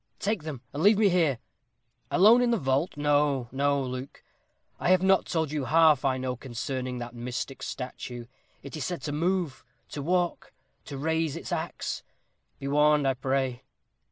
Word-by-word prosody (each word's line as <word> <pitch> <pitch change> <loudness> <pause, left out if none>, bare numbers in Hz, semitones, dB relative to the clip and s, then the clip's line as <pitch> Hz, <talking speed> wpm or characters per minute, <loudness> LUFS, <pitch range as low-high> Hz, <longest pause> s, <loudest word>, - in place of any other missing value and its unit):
"Take 210 -2 -1
them, 150 -5 -6
and 145 - -3
leave 205 +3 +6
me 210 -2 +4
here." 165 -8 +2 0.7
"Alone 220 +7 +6
in 245 - +2
the 235 - +2
vault? 135 +1 0
no, 145 -3 +2
no, 140 +2 +1
Luke, 130 +1 -6 0.6
I - - 0
have 185 0 +4
not 190 0 +3
told 160 -4 -1
you 150 -3 -2
half 155 -3 +5
I 130 -2 +1
know 130 -1 -2
concerning 125 +1 -4
that 120 0 -6
mystic 125 +2 -5
statue. 125 -2 -6 0.4
It 140 - -8
is 155 - -4
said 175 +5 -4
to 145 - -3
move 170 -1 -1 0.3
to 145 - -5
walk 175 +3 -1 0.3
to 140 - -7
raise 160 +1 0
its - - -7
axe - - -3 0.6
be 135 - -6
warned, 150 0 +3
I 135 - +3
pray." 130 -1 -1
145 Hz, 170 wpm, -27 LUFS, 130-165 Hz, 0.7 s, leave